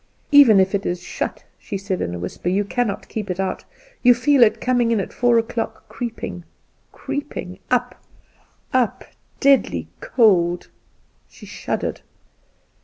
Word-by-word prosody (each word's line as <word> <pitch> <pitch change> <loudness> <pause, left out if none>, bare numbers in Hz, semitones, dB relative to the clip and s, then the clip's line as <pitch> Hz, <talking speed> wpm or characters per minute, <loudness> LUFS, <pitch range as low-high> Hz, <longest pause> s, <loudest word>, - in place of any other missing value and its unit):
"Even 275 -8 +8
if 190 +1 +2
it 200 0 0
is 175 0 -3
shut," - - -5
she 200 - -5
said, 195 -1 -3
in 85 - -3
a - - -4
whisper, 90 - -4
"you 200 +3 +1
cannot 220 -1 -2
keep 210 -3 -5
it 180 0 -3
out! 190 -1 -2 0.4
You 245 -1 +6
feel 275 +2 +3
it 225 -2 +5
coming 245 -2 +1
in 230 -2 +2
at 195 - -4
four 245 -1 +3
o'clock, 230 0 -3
creeping, 230 -7 -6 0.5
creeping, 285 -10 -6
up, 250 0 0 0.7
up; 250 -4 +1 0.3
deadly 205 - +2
cold!" 180 -7 +2 0.6
She - - -14
shuddered. - - -4
220 Hz, 145 wpm, -21 LUFS, 185-245 Hz, 0.7 s, Even